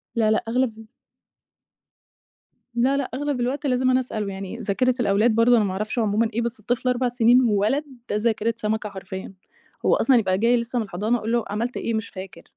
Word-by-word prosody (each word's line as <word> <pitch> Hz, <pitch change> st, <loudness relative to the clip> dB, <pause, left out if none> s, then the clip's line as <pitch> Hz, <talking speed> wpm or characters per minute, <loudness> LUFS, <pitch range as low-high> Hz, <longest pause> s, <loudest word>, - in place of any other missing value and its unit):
لأ 220 Hz, -2 st, +3 dB
لأ، 220 Hz, -, +1 dB
أغلب 245 Hz, -2 st, 0 dB
ال 225 Hz, -, -11 dB, 1.9 s
لأ 255 Hz, +4 st, +2 dB
لأ، 280 Hz, -, 0 dB
أغلب 285 Hz, 0 st, -2 dB
الوقت 265 Hz, +5 st, -2 dB
لازم 255 Hz, -1 st, +2 dB
أنا 255 Hz, 0 st, +4 dB
أسأله، 220 Hz, -5 st, -4 dB
يعني 195 Hz, +3 st, -6 dB
ذاكرة 245 Hz, +3 st, 0 dB
الأولاد 215 Hz, +1 st, +3 dB
برضو 230 Hz, +2 st, +5 dB
أنا 225 Hz, -, +3 dB
ما 200 Hz, -, -1 dB
أعرفش 215 Hz, +5 st, -3 dB
عمومًا 220 Hz, +1 st, +1 dB
إيه، 235 Hz, -, 0 dB
بس 235 Hz, 0 st, -3 dB
الطفل 245 Hz, +3 st, -1 dB
4 250 Hz, 0 st, +1 dB
سنين 245 Hz, +1 st, +4 dB
وولد، 220 Hz, +5 st, +2 dB, 0.3 s
ده -, -, -1 dB
ذاكرة 225 Hz, +1 st, +1 dB
سمكة 215 Hz, -1 st, -2 dB
حرفيًا، 190 Hz, -1 st, -8 dB, 0.5 s
هو -, -, +5 dB
أصلًا 270 Hz, -, +3 dB
يبقى 190 Hz, -5 st, +1 dB
جاي 235 Hz, +4 st, +3 dB
لسه 235 Hz, +1 st, -2 dB
من 225 Hz, -, -2 dB
الحضانة، 210 Hz, +5 st, -1 dB
أقول 225 Hz, 0 st, -4 dB
له: 235 Hz, -1 st, +1 dB
"عملت 230 Hz, +5 st, -2 dB
إيه؟" 230 Hz, -, -2 dB
"مش 220 Hz, 0 st, -2 dB
فاكر." 190 Hz, 0 st, -9 dB
230 Hz, 200 wpm, -23 LUFS, 210-245 Hz, 1.9 s, برضو